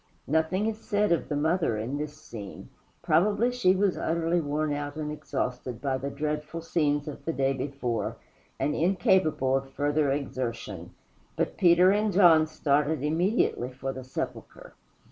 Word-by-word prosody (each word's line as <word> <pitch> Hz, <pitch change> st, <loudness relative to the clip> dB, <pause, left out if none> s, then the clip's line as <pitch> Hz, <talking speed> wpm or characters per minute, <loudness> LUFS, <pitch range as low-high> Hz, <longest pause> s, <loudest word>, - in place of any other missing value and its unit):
Nothing 160 Hz, +7 st, +1 dB
is 220 Hz, -1 st, -2 dB
said 210 Hz, -3 st, 0 dB
of 170 Hz, -, +1 dB
the 150 Hz, -, -1 dB
Mother 160 Hz, -5 st, +1 dB
in 125 Hz, +7 st, -3 dB
this 150 Hz, 0 st, -5 dB
scene. 110 Hz, -10 st, -9 dB, 0.3 s
Probably 205 Hz, +9 st, +3 dB
she 220 Hz, -7 st, +3 dB
was 195 Hz, -1 st, +1 dB
utterly 170 Hz, +1 st, 0 dB
worn 150 Hz, 0 st, -1 dB
out 145 Hz, 0 st, -4 dB
and 150 Hz, -1 st, -4 dB
exhausted 125 Hz, -5 st, -4 dB
by 135 Hz, -1 st, -1 dB
the 140 Hz, +2 st, -3 dB
dreadful 150 Hz, +3 st, -3 dB
scenes 145 Hz, -3 st, 0 dB
of 150 Hz, -, -7 dB
the 165 Hz, -, -1 dB
day 135 Hz, -3 st, +1 dB
before, 130 Hz, -5 st, -3 dB, 0.4 s
and 150 Hz, -, 0 dB
incapable 165 Hz, -5 st, +2 dB
of 135 Hz, 0 st, -2 dB
further 145 Hz, +1 st, 0 dB
exertion. 115 Hz, -, -4 dB, 0.4 s
But -, -, -1 dB
Peter 180 Hz, +1 st, +5 dB
and 210 Hz, +1 st, +1 dB
John 170 Hz, -5 st, +6 dB
started 150 Hz, -1 st, 0 dB
immediately 160 Hz, -, +1 dB
for 135 Hz, +1 st, -5 dB
the 130 Hz, -, -7 dB
sepulchre. 130 Hz, -, -6 dB
150 Hz, 155 wpm, -27 LUFS, 135-170 Hz, 0.4 s, John